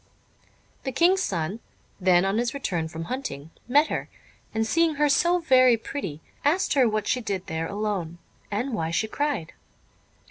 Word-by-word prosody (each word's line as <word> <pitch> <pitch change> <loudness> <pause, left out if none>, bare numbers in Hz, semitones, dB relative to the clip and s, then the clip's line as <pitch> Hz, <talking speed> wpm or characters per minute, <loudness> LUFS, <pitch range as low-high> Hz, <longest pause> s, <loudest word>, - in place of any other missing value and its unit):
The 265 - -2
King's 350 +8 +3
son, 180 - -2 0.4
then 180 -1 +4
on 195 +3 +1
his 240 +2 -1
return 175 -12 -2
from 165 0 -6
hunting, 165 - -5 0.2
met 290 +5 +4
her, - - -3 0.4
and 220 0 0
seeing 330 +6 +2
her 295 +1 +3
so 345 +5 +3
very 255 -7 +5
pretty, 190 - -6 0.2
asked 335 +7 +2
her 260 -5 +4
what 215 -1 -1
she 250 - 0
did 200 -4 -3
there 160 0 -3
alone, 200 -5 -3 0.3
and 235 +6 -2
why 165 -7 -1
she 170 +6 0
cried. 285 - -2
220 Hz, 165 wpm, -25 LUFS, 175-280 Hz, 0.4 s, very